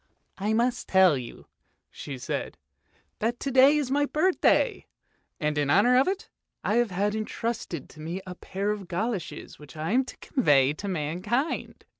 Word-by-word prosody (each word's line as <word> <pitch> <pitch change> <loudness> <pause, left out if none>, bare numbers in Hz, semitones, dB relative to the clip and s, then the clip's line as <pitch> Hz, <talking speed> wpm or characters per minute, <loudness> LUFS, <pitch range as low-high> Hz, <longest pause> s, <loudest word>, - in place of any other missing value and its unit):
" - - -47
I - - +2
must 240 +2 0
tell 190 -4 +6
you," 125 -3 -8 0.5
she 140 -2 -7
said, 125 - -4 0.3
" - - -39
that 235 +3 -1
to 275 - -2
day 265 +3 +6
is 280 -4 -1
my 290 +1 +2
birthday, 370 +10 +2 0.5
and 150 -1 0
in 145 -1 0
honour 210 +10 +5
of 260 +2 +4
it 385 +2 -2 0.4
I 215 - +1
have 240 -2 +2
had 200 +3 0
intrusted 220 - -4
to - - -15
me 170 +4 -4
a 185 - -6
pair 195 +3 -3
of 205 -3 -5
goloshes 190 0 -4
which 150 0 -13
I 155 +4 -2
am 255 +3 +3
to - - -10
convey 145 - +3
to 200 +6 -7
mankind. 185 - -2
205 Hz, 180 wpm, -27 LUFS, 165-245 Hz, 0.5 s, tell